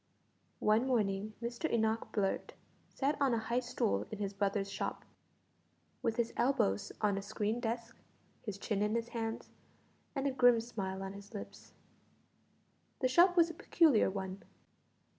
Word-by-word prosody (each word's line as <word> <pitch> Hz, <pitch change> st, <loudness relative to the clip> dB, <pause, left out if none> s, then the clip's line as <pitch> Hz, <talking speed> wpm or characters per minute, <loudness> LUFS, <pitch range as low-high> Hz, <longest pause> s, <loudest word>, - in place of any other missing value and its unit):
One 220 Hz, +4 st, +3 dB
morning 210 Hz, -4 st, 0 dB
Mr 240 Hz, +6 st, -2 dB
Enoch 220 Hz, 0 st, +1 dB
Blurt 195 Hz, -3 st, -1 dB, 0.4 s
sat 285 Hz, +2 st, 0 dB
on 265 Hz, -4 st, +4 dB
a -, -, 0 dB
high 230 Hz, +2 st, 0 dB
stool 105 Hz, -, -1 dB
in -, -, -5 dB
his 200 Hz, -1 st, -3 dB
brother's 200 Hz, 0 st, 0 dB
shop, 195 Hz, -, -4 dB, 1.0 s
with 225 Hz, -, 0 dB
his 235 Hz, -1 st, 0 dB
elbows 105 Hz, -, +1 dB
on 205 Hz, -2 st, +2 dB
a -, -, -5 dB
screened 215 Hz, +3 st, -2 dB
desk, 230 Hz, 0 st, -3 dB, 0.5 s
his 210 Hz, -4 st, -5 dB
chin 200 Hz, 0 st, -1 dB
in 210 Hz, +2 st, +1 dB
his 235 Hz, 0 st, -1 dB
hands, 225 Hz, -1 st, -4 dB, 0.7 s
and 275 Hz, -, -1 dB
a 280 Hz, -, +2 dB
grim 245 Hz, -2 st, +5 dB
smile 195 Hz, -5 st, -4 dB
on 195 Hz, 0 st, -5 dB
his 200 Hz, +2 st, -11 dB
lips. 205 Hz, -, -9 dB, 1.3 s
The 255 Hz, -, +4 dB
shop 350 Hz, +7 st, +5 dB
was 335 Hz, -1 st, +5 dB
a -, -, -11 dB
peculiar 310 Hz, -, +4 dB
one. 190 Hz, 0 st, -5 dB
225 Hz, 155 wpm, -34 LUFS, 200-245 Hz, 1.3 s, grim